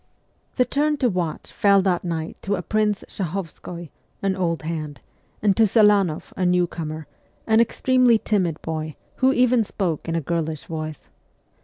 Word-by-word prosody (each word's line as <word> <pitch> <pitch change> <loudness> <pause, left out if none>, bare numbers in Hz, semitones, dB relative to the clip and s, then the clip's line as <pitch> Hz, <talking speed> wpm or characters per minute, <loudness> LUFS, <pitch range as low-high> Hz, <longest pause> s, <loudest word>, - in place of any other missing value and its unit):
The 250 - +3
turn 295 +4 +1
to 255 -3 +2
watch 175 -5 -3
fell 200 -3 +4
that 180 -3 +1
night 165 -2 -3
to 200 - -1
a 180 - -5
Prince 215 0 0
Shahovskoy, 175 -2 -6 0.3
an 195 -1 +1
old 170 -4 -1
hand, 155 -4 -4 0.4
and 200 -2 +4
to 225 -1 +5
Selanoff, 205 -6 +3
a 185 - -2
new 180 0 +3
comer, 155 -2 -6 0.4
an 220 0 +4
extremely 250 0 +4
timid 185 -8 0
boy, 155 -1 -4 0.2
who 260 +1 +4
even 250 -2 +3
spoke 175 -6 -3
in 165 - -1
a - - +2
girlish 160 -1 -3
voice. 155 -2 -6
180 Hz, 160 wpm, -23 LUFS, 160-215 Hz, 0.4 s, to